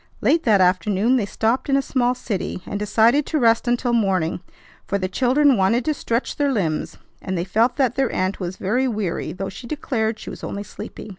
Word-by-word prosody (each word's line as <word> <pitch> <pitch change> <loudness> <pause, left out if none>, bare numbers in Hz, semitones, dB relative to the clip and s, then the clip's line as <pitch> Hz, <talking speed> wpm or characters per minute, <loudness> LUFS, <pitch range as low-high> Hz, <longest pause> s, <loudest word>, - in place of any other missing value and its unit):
Late 330 - +3
that 210 -5 +4
afternoon 195 +6 +2
they 210 -5 -1
stopped 230 +7 -1
in 275 - +4
a - - +2
small 250 -2 +1
city, 195 -6 -4
and 200 - -4
decided 225 +7 +3
to 315 - 0
rest 230 -3 +3
until 240 0 +1
morning; 190 -8 +1 0.5
for 200 - 0
the 185 -1 -2
children 265 +7 +3
wanted 215 +6 +2
to 310 - +1
stretch 235 -3 -2
their 285 -1 +1
limbs, 170 -10 -2 0.2
and 185 -1 -3
they 170 - -2
felt 225 +6 +2
that 260 -4 +1
their 270 -2 0
aunt 185 +1 -1
was 185 -1 -4
very 245 +7 0
weary 210 -7 -2
though 195 +1 -5
she 240 - -10
declared 230 -6 -2
she - - -8
was - - -10
only 200 - -4
sleepy. 215 - -9
225 Hz, 210 wpm, -22 LUFS, 195-255 Hz, 0.5 s, that